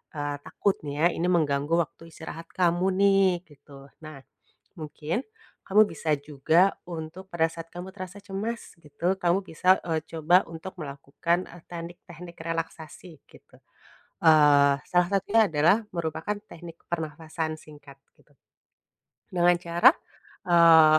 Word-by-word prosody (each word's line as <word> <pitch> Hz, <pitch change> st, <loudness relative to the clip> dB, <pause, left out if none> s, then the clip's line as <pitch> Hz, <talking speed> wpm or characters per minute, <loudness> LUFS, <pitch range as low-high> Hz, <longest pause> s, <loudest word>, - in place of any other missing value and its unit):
eee, 145 Hz, -1 st, -3 dB
takutnya 155 Hz, -5 st, 0 dB
ini 175 Hz, -, -1 dB
mengganggu 145 Hz, -3 st, +1 dB
waktu 165 Hz, 0 st, -5 dB
istirahat 160 Hz, +1 st, -9 dB
kamu 175 Hz, 0 st, +1 dB
nih, 195 Hz, -1 st, +5 dB, 0.2 s
gitu. 140 Hz, -2 st, -16 dB, 0.2 s
Nah 155 Hz, -3 st, -9 dB, 0.6 s
mungkin 155 Hz, -, -4 dB, 0.4 s
kamu 210 Hz, +3 st, +5 dB
bisa 155 Hz, -, -3 dB
juga 155 Hz, +6 st, +2 dB
untuk 170 Hz, +3 st, -7 dB
pada 165 Hz, -1 st, +2 dB
saat 165 Hz, 0 st, -9 dB
kamu 180 Hz, +1 st, -7 dB
terasa 185 Hz, 0 st, -8 dB
cemas 205 Hz, +4 st, -5 dB
gitu, 170 Hz, +5 st, -1 dB
kamu 175 Hz, 0 st, +2 dB
bisa, 185 Hz, +4 st, +3 dB
eee, 160 Hz, -1 st, 0 dB
coba 165 Hz, +3 st, +3 dB
untuk 165 Hz, +3 st, -9 dB
melakukan, 150 Hz, +5 st, -2 dB
e 175 Hz, -, -13 dB
teknik-teknik 170 Hz, 0 st, -9 dB
relaksasi 165 Hz, 0 st, -6 dB
gitu, -, -, -20 dB, 0.7 s
eee, 145 Hz, -3 st, +6 dB, 0.2 s
salah 180 Hz, -1 st, +3 dB
satunya 205 Hz, +3 st, +3 dB
adalah 160 Hz, +5 st, +4 dB, 0.2 s
merupakan 160 Hz, +4 st, -2 dB, 0.2 s
teknik 170 Hz, 0 st, -11 dB
pernapasan 160 Hz, -1 st, -4 dB
singkat 145 Hz, -2 st, -15 dB, 0.2 s
gitu 150 Hz, -, -27 dB, 1.0 s
dengan 175 Hz, -1 st, +4 dB
cara, 175 Hz, +6 st, +5 dB, 0.6 s
eee, 165 Hz, -3 st, +7 dB
165 Hz, 125 wpm, -26 LUFS, 155-180 Hz, 1.0 s, eee